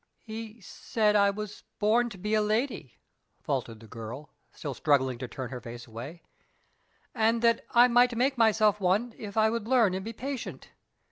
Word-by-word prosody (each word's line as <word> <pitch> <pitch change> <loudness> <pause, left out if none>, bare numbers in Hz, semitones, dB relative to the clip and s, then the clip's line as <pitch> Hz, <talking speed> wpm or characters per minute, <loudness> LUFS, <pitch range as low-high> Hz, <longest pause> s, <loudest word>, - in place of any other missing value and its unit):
"He 225 0 -8
said 210 +2 0
I 200 -1 +5
was 210 +1 -6 0.2
born 230 +3 +2
to 205 - -10
be 210 +4 -3
a 215 - +4
lady," 215 - -1 0.5
faltered 115 -1 -3
the 115 - -13
girl, 115 +7 -8 0.2
still 145 -3 -6
struggling 130 -2 +1
to 130 - -4
turn 125 +2 -6
her 125 -2 -6
face 120 0 -9
away, 125 +10 -9 0.9
"and 225 +1 +1
that 230 0 +3
I 240 +1 +6
might 245 0 +4
make 265 +3 +2
myself 215 -3 +3
one 205 +6 +1
if 210 -1 -7
I 220 0 +4
would 230 -2 -3
learn 235 -7 +4
and 190 +1 -3
be 225 +2 -6
patient. 265 +2 -6
210 Hz, 180 wpm, -28 LUFS, 145-230 Hz, 0.9 s, I